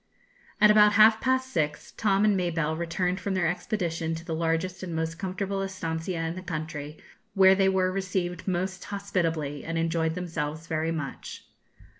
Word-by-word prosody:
At 210 -1 +7
about 210 0 +6
half 220 +1 +6
past 260 0 +1
six, 150 -3 -1
Tom 200 -1 +2
and 210 -2 +4
Mabelle 165 -4 0
returned 180 +3 -1
from 200 -1 -2
their 180 -2 +1
expedition 170 -2 -2
to 165 +1 -8
the 165 - -3
largest 165 +3 -1
and 175 -3 -5
most 160 +1 -3
comfortable 195 +1 -2
estancia 165 -3 -3
in 160 - -2
the 185 - -7
country, 155 -4 -5 0.4
where 190 -1 +7
they 190 0 +3
were 185 -1 +2
received 185 -2 -3
most 185 +1 -2
hospitably, 165 -8 -2
and 165 0 -3
enjoyed 165 0 0
themselves 160 -3 -4
very 160 0 -1
much. 155 -4 -6
175 Hz, 165 wpm, -27 LUFS, 160-190 Hz, 0.4 s, At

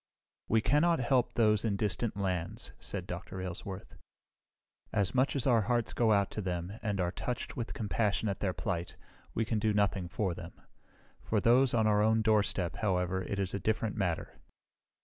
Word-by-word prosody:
"We 110 0 +3
cannot 165 +7 +3
help 125 0 +1
those 105 -3 +3
in 110 -3 +1
distant 105 +1 -1
lands," 90 -4 -2
said 95 -3 -4
Dr. 95 +1 -6
Aylesworth. 95 +1 -6 0.9
"As 100 -2 0
much 130 +3 +2
as 135 - +1
our 120 -4 +4
hearts 120 +2 0
go 115 -2 +3
out 100 -2 +3
to 105 - -3
them 90 +2 -4
and 105 -3 -2
are 90 -1 +1
touched 120 +6 -4
with 120 -1 -4
compassion 105 -1 0
at 100 - -2
their 100 - 0
plight, 90 -2 -3 0.4
we 115 - +1
can 110 -1 0
do 105 0 +1
nothing 100 -3 +1
for 95 0 -1
them. 85 0 -9 0.7
For 110 - 0
those 125 +4 +4
on 110 -2 +3
our 105 -1 +4
own 110 +1 +3
doorstep, 100 -5 +2
however, 95 -2 0
it 100 +2 -4
is 95 -1 -1
a 100 - -1
different 110 0 -1
matter. 90 -6 -2
105 Hz, 180 wpm, -31 LUFS, 95-115 Hz, 0.9 s, our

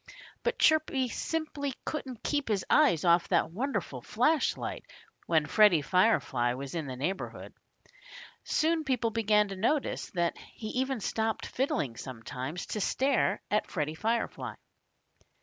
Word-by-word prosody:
But 485 +1 -1
Chirpy 305 -5 +3
simply 295 -2 -3
couldn't 260 -6 -5
keep 290 -1 0
his 205 -4 0
eyes 170 0 +4
off 170 0 +4
that 160 - +2
wonderful 200 - -3
flash 260 - +2
light - - -5 0.4
when 160 -2 +3
Freddie 175 -1 +5
Firefly 135 - +2
was 135 +1 -6
in 160 -4 -3
the 130 - -5
neighborhood. 165 +10 -4 1.3
People 250 -5 0
began 210 -2 +3
to 195 - -5
notice 245 +9 0
that 170 -1 +1 0.2
he 215 - -6
even 260 -1 -1
stopped 220 +2 -1
fiddling 145 - -1
sometimes, 130 +5 -6
to 210 - -3
stare 265 +6 +1
at 210 - +1
Freddie 155 -3 -2
Firefly. 225 +7 -2
210 Hz, 130 wpm, -30 LUFS, 160-260 Hz, 1.3 s, Freddie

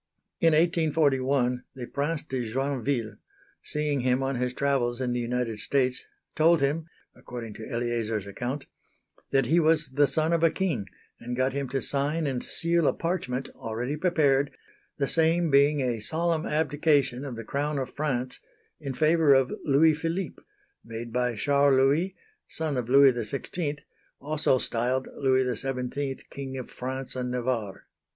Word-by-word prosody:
In 165 -1 +4
1841, 140 -6 +2
the 125 -2 -6
Prince 145 +5 -2
de 125 -6 -4
Joinville, 130 -3 -1 0.4
seeing 150 -2 -1
him 125 +1 +1
on 135 +1 0
his 125 0 -1
travels 125 -3 0
in 125 -2 -1
the 120 - -1
United 120 -2 -2
States, 130 +3 0 0.3
told 165 +1 +5
him 150 +4 0 0.3
(according 115 -3 -8
to 110 +1 -9
Eleazar's 115 -4 -2
account) 125 +7 -4 0.6
that 135 -1 +2
he 165 +8 +3
was 160 -2 +3
the 145 +2 +3
son 155 +4 +1
of 165 - +2
a 165 - +6
king, 155 - -2 0.3
and 120 +1 -5
got 130 +1 +1
him 140 -2 -3
to 135 +1 -2
sign 145 +3 0
and 130 -3 -2
seal 170 -2 +1
a - - +3
parchment, 145 -7 -2
already 120 +5 -4
prepared, 145 -5 +2 0.5
the 140 - 0
same 165 +1 +2
being 140 +1 +4
a 120 -3 -1
solemn 160 +7 0
abdication 145 -4 +1
of 135 -4 -5
the 115 - -6
Crown 145 +3 -2
of 130 -2 -4
France 130 -4 -2 0.4
in 140 -4 -5
favour 155 -1 +4
of 135 -1 +2
Louis 155 +3 +5
Philippe, 165 +4 -3 0.4
made 115 0 -7
by 125 -1 0
Charles 140 +4 +3
Louis, 150 +8 +2 0.3
son 160 -3 -2
of 125 -2 -2
Louis 135 0 +7
XVI, 145 +6 -3 0.4
also 150 -2 +1
styled 125 +2 -1
Louis 130 -1 +3
XVII 135 +2 -3
King 135 -1 -6
of 130 - -7
France 130 +1 -4
and 125 -1 -2
Navarre. 120 -5 -2
135 Hz, 155 wpm, -27 LUFS, 125-150 Hz, 0.6 s, Louis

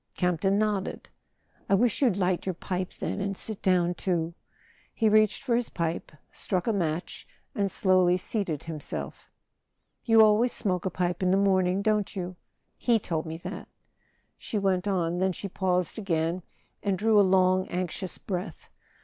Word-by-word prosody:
Camp 180 -3 0
ton 195 +1 +2
nodded. 210 -2 -1 0.6
"I 200 - +5
wish 230 +5 +2
you'd 235 -9 +3
light 185 -1 0
your 185 - -1
pipe, 185 +1 -3
then, - - -3
and 195 -1 -2
sit 220 -3 -4
down 180 -2 +2
too." 170 -1 -1 0.6
He 225 - +2
reached 215 +2 +3
for 250 -4 +1
his 240 0 0
pipe, 170 -1 -3 0.2
struck 185 -2 -2
a 225 - +1
match, 170 -3 -3 0.3
and 200 -6 0
slowly 185 -1 +3
seated 185 -6 -3
himself. 160 -3 -6 0.7
"You 225 -1 +6
always 220 +3 +4
smoke 185 -3 -1
a - - +1
pipe 180 -1 -2
in 185 - +2
the 190 - +4
morning, 190 -1 +2
don't 210 -1 0
you? 180 -1 -4 0.4
He 235 -2 +3
told 165 -6 -3
me 160 0 -5
that," - - -6 0.7
she 215 - -4
went 190 -1 +1
on; 175 -3 0
then 190 0 +1
she 200 - -5
paused 180 +1 -1
again 170 -2 -1 0.4
and 195 -2 0
drew 215 +2 +4
a - - +8
long 185 -1 +3
anxious 180 +1 -3
breath. 185 0 -5
185 Hz, 165 wpm, -27 LUFS, 180-205 Hz, 0.7 s, a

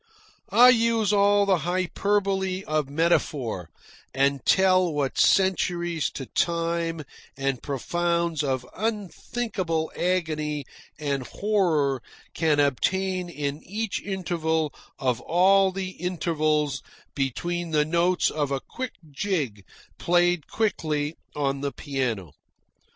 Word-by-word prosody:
I 240 +5 +8
use 230 -3 +3
all 205 0 +4
the 190 -3 +3
hyperbole 190 +3 0
of 155 -4 -1
metaphor, 140 - 0 0.5
and 140 0 +2
tell 185 -2 +4
what 145 -3 -1
centuries 175 -4 +2
of 135 - -8
time 170 -1 0 0.3
and 135 -2 -1
profounds 170 +3 -1
of 130 -3 -1
unthinkable 200 -5 -2
agony 155 -5 -1 0.3
and 140 -4 -2
horror 165 - +1 0.3
can 155 -2 +2
obtain 185 +6 +1
in 145 -2 -4
each 215 +3 -3
interval 160 -6 -1 0.2
of 125 -3 0
all 190 +3 +4
the 190 0 -4
intervals 155 -5 0 0.3
between 170 +6 -2
the 150 -2 +2
notes 175 +3 +2
of 145 -2 -1
a 140 -1 -1
quick 255 - -6 0.2
jig 140 - -2 0.4
played 175 -2 +2
quickly 155 -9 -1 0.2
on 140 -2 -1
the 140 0 -1
piano. 125 - -3
170 Hz, 105 wpm, -25 LUFS, 145-190 Hz, 0.5 s, I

